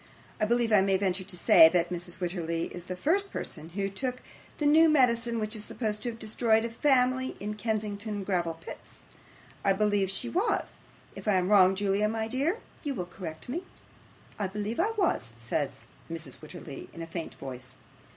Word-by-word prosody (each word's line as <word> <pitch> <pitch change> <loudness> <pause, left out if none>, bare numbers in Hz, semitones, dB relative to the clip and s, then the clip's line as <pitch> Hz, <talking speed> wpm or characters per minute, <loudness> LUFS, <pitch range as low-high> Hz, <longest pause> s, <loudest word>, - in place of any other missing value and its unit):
I 215 - +3
believe 235 +1 +2
I 210 -2 +6
may 195 0 +3
venture 190 -1 0
to 180 -1 -4
say, 160 -1 +8
that 170 0 +1
Mrs. 175 0 -4
Wititterly 170 -2 -2
is 175 -1 -7
the 185 - -4
first 390 - +1
person 160 +1 -6
who 195 +3 -2
took 250 +6 -3 0.3
the 300 - -1
new 315 +2 +7
medicine 235 -5 +3
which 215 +1 -1
is 210 - -5
supposed 215 -2 -3
to 240 - -2
have 230 - -7
destroyed 225 0 +2
a 230 - -4
family 260 0 +2
at 210 +1 -4
Kensington 210 -1 -2
Gravel 175 -4 0
Pits. 165 - -11 0.6
I 195 - +4
believe 205 -1 +2
she 195 +5 -2
was. 370 - 0 0.4
If - - -9
I 210 - +4
am 185 0 +2
wrong, 190 -2 +6
Julia, 205 +1 +1
my 220 0 -2
dear, 280 - 0 0.3
you 285 -3 -2
will 180 - -3
correct 170 -3 -8
me.' 320 +9 -3 0.8
'I 200 - 0
believe 210 - -4
I 385 +6 +3
was,' 220 - 0
said 120 +4 -1 0.4
Mrs. 165 -1 -6
Wititterly, 155 -3 -9
in 165 - -6
a - - -4
faint 165 0 -6
voice. 130 -1 -8
205 Hz, 190 wpm, -29 LUFS, 180-235 Hz, 0.8 s, say